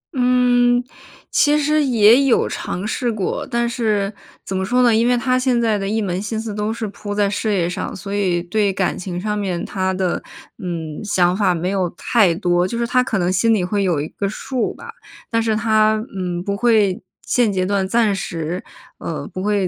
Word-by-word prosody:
嗯， 245 -1 +3 0.5
其 295 +1 +4
实 300 +1 +2
也 240 0 +5
有 255 - +3
尝 185 +4 -4
试 240 +1 -1
过。 205 -4 -2
但 235 0 0
是 215 -4 -1 0.3
怎 195 - -4
么 190 - -1
说 250 +6 +2
呢， 235 -2 +4
因 230 +2 +3
为 245 0 +3
他 255 +1 +1
现 255 -2 +1
在 225 -3 +2
的 195 -1 -3
一 220 +2 0
门 185 -2 -2
心 215 +1 -3
思 220 -1 -5
都 210 +1 -2
是 225 -1 -4
扑 205 0 -6
在 205 -1 +2
事 215 +1 -1
业 180 -4 +1
上， 180 - -4
所 195 +2 -6
以 185 -4 +1
对 200 +3 +1
感 190 0 -1
情 180 -1 -5
上 210 +2 -2
面 185 -4 -2
他 190 -1 -1
的， 185 -2 -1 0.4
嗯， 165 -3 -5
想 180 -3 +2
法 195 -3 +2
没 170 +2 -2
有 185 -3 0
太 210 -8 +3
多， 175 -1 +1
就 230 - -4
是 235 - 0
他 250 +1 +3
可 225 - -1
能 180 -1 +1
心 225 +5 +3
里 205 -4 +1
会 200 +2 -1
有 175 -6 +1
一 150 - -3
个 200 +3 -3
数 250 +4 -3
吧， 470 - -10 0.4
但 230 0 +2
是 225 -1 0
他， 215 -1 +3 0.2
嗯， 180 -2 -3
不 200 +1 -2
会 210 -4 +2 0.2
现 240 -4 +2
阶 185 -2 0
段 195 0 0
暂 225 -1 +2
时， 175 -2 -4 0.4
呃， - - -5
不 185 - -4
会 205 -2 +1
205 Hz, 225 characters per minute, -20 LUFS, 185-235 Hz, 0.5 s, 也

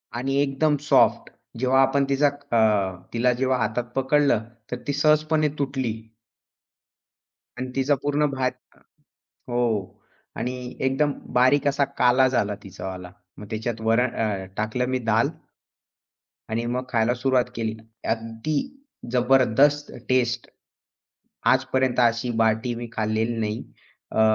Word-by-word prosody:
आणि 135 +3 -1
एकदम 145 +2 +1
सॉफ्ट. 115 -4 +4 0.3
जेव्हा 130 +1 +3
आपण 135 +1 +3
तिचा 140 +2 +3
अ, 110 -9 +1 0.2
तिला 125 +1 +2
जेव्हा 130 +1 +1
हातात 115 +1 -1
पकडलं 135 -4 +2 0.3
तर 125 - -2
ती 145 - 0
सहजपणे 155 +1 +3
तुटली. 135 -5 -1 1.6
आणि 125 0 -4
तिचा 135 +2 +2
पूर्ण 145 +1 +1
भाग 130 -1 0 1.0
हो. 115 -5 -1 0.4
आणि 125 0 -4
एकदम 135 +3 +1 0.2
बारीक 130 +3 +4
असा 140 0 +2
काला 125 +1 +5
झाला 105 -5 0
तिचावाला. 95 -2 -7 0.3
मग 105 - -9
त्याच्यात 110 +1 -3
वरण 115 +2 +2
अ, 100 -4 -1
टाकलं 110 +4 -1
मी 130 - 0
दाल 110 +2 +3 1.2
आणि 115 +1 -1
मग 125 +2 -2
खायला 120 0 +2
सुरुवात 130 0 +2
केली. 110 -1 -2 0.3
अगदी, 115 +6 -2 0.5
जबरदस्त 135 +3 +3 0.2
टेस्ट! 125 -1 +1 1.0
आजपर्यंत 130 -1 0
अशी 120 +1 +2
बाटी 110 +2 +1
मी 120 0 -6
खाल्लेली 110 +1 -1
नाही. 105 0 -2 0.5
अ, 110 - +1
125 Hz, 120 wpm, -24 LUFS, 115-135 Hz, 1.6 s, काला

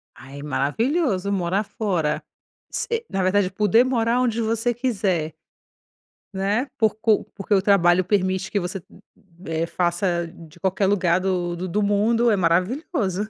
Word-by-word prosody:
Ai, 135 +3 -11
maravilhoso, 200 - 0
morar 190 +1 0
fora, 180 -8 -2 0.5
se 465 0 -2
na 195 - -1
verdade 185 0 +2
poder 210 +4 +4
morar 245 -1 +1
onde 235 -2 0
você 225 +2 0
quiser 195 -10 -1 1.0
né, 200 +6 0
porcu 220 -1 +2
porque 200 +1 -2
o 195 - +4
trabalho 185 -2 +4
permite 190 0 0
que 205 - 0
você, 180 +1 -4 0.6
eh, 165 +1 -2
faça 175 0 0
de 165 -1 -15
qualquer 190 +2 0
lugar 185 -3 +2
do 180 -2 -1
do 180 +2 -4
do 205 +4 0
mundo, 225 +4 +2
é - - +3
maravilhoso. 195 - 0
195 Hz, 140 wpm, -23 LUFS, 175-220 Hz, 1.0 s, poder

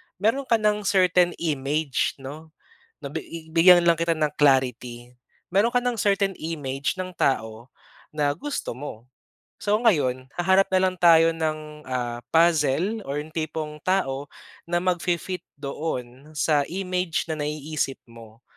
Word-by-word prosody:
Meron 230 +8 0
ka 230 - +4
ng 210 -1 +1
certain 180 -2 +3
image 145 -2 -1
'no, 145 +4 -9 0.6
nabi 160 +2 -7
bigyan 175 +1 +7
lang 170 -1 +3
kita 165 0 +2
ng 155 -2 0
clarity, 125 -3 +1 0.4
meron 210 +6 +2
ka 245 - +4
ng 245 -2 -1
certain 200 -1 +2
image 145 -3 -3
ng 185 0 -5
tao 110 -3 -1 0.5
na 145 -1 +2
gusto 290 - -4
mo. 125 -3 -9 0.5
So 210 +1 +2
ngayon, 135 - +1
haharap 190 +2 +3
na 185 - +4
lang 185 - -9
tayo 165 -1 +6
ng, 155 -2 -4
ah, 120 -2 -3
puzzle 165 +5 +3
or 145 +2 -2
yung 155 - -14
tipong 155 -1 -4
tao 145 -7 0 0.4
na 175 +1 0
magfi-fit 180 0 -1
doon 140 -1 -6
sa 150 -1 +2
image 180 -1 -2
na 155 - -3
naiisip 150 -1 -2
mo. 115 0 -15
160 Hz, 140 wpm, -24 LUFS, 140-180 Hz, 0.6 s, bigyan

